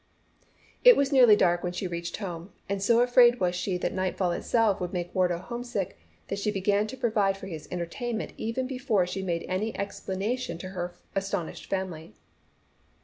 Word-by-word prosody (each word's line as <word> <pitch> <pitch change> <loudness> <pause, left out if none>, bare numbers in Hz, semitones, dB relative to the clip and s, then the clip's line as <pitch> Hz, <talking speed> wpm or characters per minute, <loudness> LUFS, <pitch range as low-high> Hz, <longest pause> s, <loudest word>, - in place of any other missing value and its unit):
It - - +9
was 280 0 +2
nearly 250 -6 +7
dark 175 -3 +3
when 180 0 -3
she 185 - -3
reached 170 -1 -4
home, 180 -2 -6 0.2
and 200 0 -2
so 230 +4 +4
afraid 245 0 +6
was 180 -1 +1
she 180 +1 -1
that - - -1
the - - -8
nightfall 185 -1 0
itself 215 +3 +1
would 180 0 -3
make 175 -1 -3
Wardo 180 -2 +2
homesick, 235 0 -4 0.3
that - - -3
she 210 - 0
began 205 +1 +1
to 260 - -7
provide 215 -6 +1
for 195 - -9
his 160 -5 -7
entertainment 220 +7 -3
even 230 +4 -2
before 250 -7 +1
she 185 +2 -4
made 170 -3 -2
any 205 +4 -2
explanation 200 0 -3
to 185 +2 -7
her 175 -2 -5 0.2
astonished 195 -4 -3
family. 175 - -4
195 Hz, 180 wpm, -28 LUFS, 180-230 Hz, 0.3 s, It